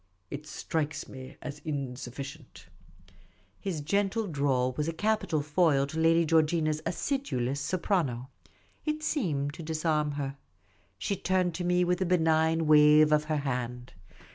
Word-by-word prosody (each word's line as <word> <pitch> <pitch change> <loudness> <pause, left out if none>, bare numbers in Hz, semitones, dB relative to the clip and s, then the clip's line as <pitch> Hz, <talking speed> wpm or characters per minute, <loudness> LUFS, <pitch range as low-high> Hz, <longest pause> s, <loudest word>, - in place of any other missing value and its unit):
It 150 +2 -6
strikes 155 0 -3
me 130 -1 -10
as 150 0 -6
insufficient." 135 0 -6 0.9
His 180 -6 -3
gentle 200 +7 0
drawl 140 -6 +1
was 150 0 -1
a 165 - -1
capital 205 -5 0
foil 150 -2 +3
to 155 +3 -5
Lady 165 +1 +4
Georgina' 160 0 +3
s 155 0 -3
acidulous 155 - -1
soprano. 140 - -1 0.5
It 305 0 -2
seemed 150 - -1
to 165 - -8
disarm 155 -2 0
her. 140 -1 -4 0.6
She 150 - -1
turned 185 -1 0
to 175 - -4
me 180 0 +2
with 180 +1 0
a 185 - +1
benignant 160 -2 +3
wave 150 0 +7
of 150 0 +3
her 155 0 0
hand. 125 -3 -3
155 Hz, 140 wpm, -29 LUFS, 140-175 Hz, 0.9 s, wave